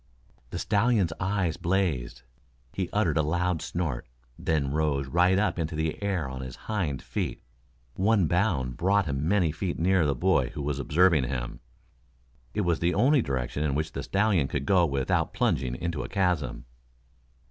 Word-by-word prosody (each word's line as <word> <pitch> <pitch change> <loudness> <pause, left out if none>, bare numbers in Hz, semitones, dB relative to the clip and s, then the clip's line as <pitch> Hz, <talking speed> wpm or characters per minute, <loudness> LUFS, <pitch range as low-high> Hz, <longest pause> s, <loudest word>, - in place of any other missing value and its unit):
The - - -5
stallion's 105 -5 +2
eyes 95 -3 0
blazed. 80 -10 -1 0.5
He 95 -2 -2
uttered 90 -8 +1
a - - +4
loud 85 +2 0
snort, 80 -10 -3 0.3
then 70 -3 -1
rose 75 -2 0
right 90 +6 +3
up 105 -2 +1
into 80 0 -2
the 80 +3 -2
air 95 -7 -1
on 65 0 -6
his 65 -1 -7
hind 90 -11 -2
feet. - - -4 0.5
One 100 - +2
bound 75 - 0
brought 100 +2 +2
him 70 0 -2
many 90 -4 +2
feet 85 +3 -3
nearer 90 -1 +3
the 70 - +1
boy - - +2
who 75 - -4
was 70 -1 -2
observing 75 +1 +3
him. - - -4 1.0
It - - +1
was 85 -4 +1
the 85 +1 +1
only 135 +6 +4
direction 70 - -2
in 70 -3 0
which 80 +1 -1
the - - -4
stallion 100 -7 +1
could 70 0 -3
go 90 +1 +4
without 70 -2 0
plunging 65 -2 0
into 85 0 -3
a - - -6
chasm. 90 - -1
80 Hz, 170 wpm, -27 LUFS, 70-95 Hz, 1.0 s, a